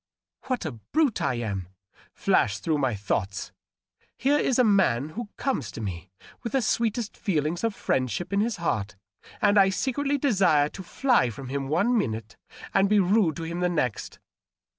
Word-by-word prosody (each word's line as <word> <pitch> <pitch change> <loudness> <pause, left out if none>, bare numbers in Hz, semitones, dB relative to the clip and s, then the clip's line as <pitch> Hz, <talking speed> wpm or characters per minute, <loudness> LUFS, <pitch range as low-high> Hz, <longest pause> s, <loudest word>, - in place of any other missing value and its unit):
* - - -66
What 255 -7 -1
a 155 - -2
brute 220 - 0
I 130 - +1
am 100 -6 -3 0.2
!' - - -28
flashed 100 0 +1
through 155 -3 +1
my 130 -5 +1
thoughts. 100 -1 -2 0.5
^ - - -39
Here 285 +3 +2
is 255 - +1
a 250 - +5
man 190 - +3
who 215 +6 -6
comes 260 - -1
to - - -7
me 95 -4 -5 0.3
with 235 - -5
the 270 - +3
sweetest 225 0 0
feelings 165 -1 -1
of 225 -3 0
friendship 130 - -1
in 200 - +2
his 225 0 0
heart, 110 - -2 0.5
and 205 0 +5
I 195 -1 +6
secretly 275 +8 0
desire 190 - +3
to 190 - -9
fly 240 - +2
from 130 +3 -8
him 135 0 -3
one 200 - +2
minute 115 - -2 0.4
and 195 0 +3
be 210 0 +4
rude 190 -4 +3
to 165 - -5
him 170 +2 -4
the 180 0 +1
next.' 125 -10 -2
175 Hz, 185 wpm, -26 LUFS, -, 0.5 s, I